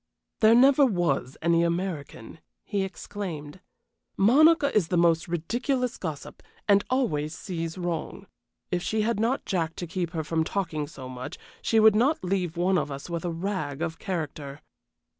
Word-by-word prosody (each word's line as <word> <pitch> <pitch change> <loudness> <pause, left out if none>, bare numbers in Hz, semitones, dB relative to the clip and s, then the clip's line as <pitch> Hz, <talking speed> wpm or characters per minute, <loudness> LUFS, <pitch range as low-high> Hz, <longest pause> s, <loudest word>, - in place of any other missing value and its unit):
"There 220 +1 +6
never 270 +3 +6
was 175 - 0
any 170 0 +3
American," 170 -7 -3 0.2
he 200 - -2
exclaimed. 185 -4 -6 0.6
"Monica 285 +7 +5
is 200 -6 +3
the 180 - 0
most 170 -1 +3
ridiculous 240 - -1
gossip, 155 -5 -6 0.3
and 200 -1 +5
always 155 - 0
sees 165 -1 -5
wrong. 175 +1 -4 0.5
If 180 -1 0
she 215 +3 0
had 225 -1 0
not 235 +5 0
Jack 165 -3 -1
to 175 - -5
keep 175 0 -3
her 160 -2 -2
from 160 +1 0
talking 160 -5 -2
so 135 -4 -9
much 130 0 -7 0.2
she 225 - +2
would 220 -1 +7
not 255 +5 +2
leave 180 -3 -1
one 180 +1 +2
of - - -3
us 140 +4 -7
with 170 0 -3
a 175 - -1
rag 165 -4 -3
of 165 -1 -4
character." 150 -5 -5
175 Hz, 160 wpm, -26 LUFS, 160-205 Hz, 0.6 s, would